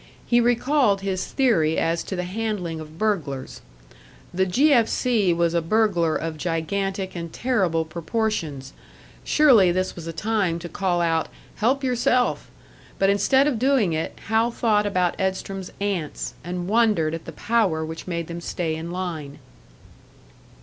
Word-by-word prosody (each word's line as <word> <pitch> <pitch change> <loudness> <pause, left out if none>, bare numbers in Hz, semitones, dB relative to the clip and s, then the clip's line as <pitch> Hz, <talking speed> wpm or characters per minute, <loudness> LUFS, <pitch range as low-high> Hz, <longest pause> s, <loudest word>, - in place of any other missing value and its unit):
He 240 0 +3
recalled 240 -3 +2
his 190 -2 -2
theory 170 - +2
as 165 +1 +1
to 190 - -4
the 180 - -2
handling 185 -4 -3
of 155 0 -10
burglars. 165 -11 -2 0.7
The 190 +1 +1
"G. 280 +11 +4
F. 230 -4 +4
C." 220 -7 +1
was 170 0 +1
a 170 - +2
burglar 175 -3 +2
of 160 -1 -3
gigantic 190 +4 -2
and 170 -1 -5
terrible 185 -11 0
proportions; 160 - -3 0.5
surely 240 -12 +5
this 185 +1 -1
was 165 -2 -8
a - - -3
time 200 -2 0
to 170 0 -7
call 180 -1 -1
out, 165 -1 +1 0.3
"Help 260 +6 +1
yourself!" 250 0 +1 0.5
But 195 0 +3
instead 265 +7 +3
of 280 -7 0
doing 250 -9 +2
it, 160 0 -3
Hal 225 +2 +2
thought 215 -3 +1
about 180 -3 +1
Edstrom's 190 0 -3
ants, 195 -7 -3
and 175 +1 -4
wondered 210 -8 +2
at 165 - -6
the - - -7
power 195 -9 0
which 160 +2 -8
made 170 -2 -2
them 170 +1 -7
stay 165 -2 -2
in 160 +1 -6
line. 170 -6 -5
185 Hz, 155 wpm, -23 LUFS, 165-220 Hz, 0.7 s, surely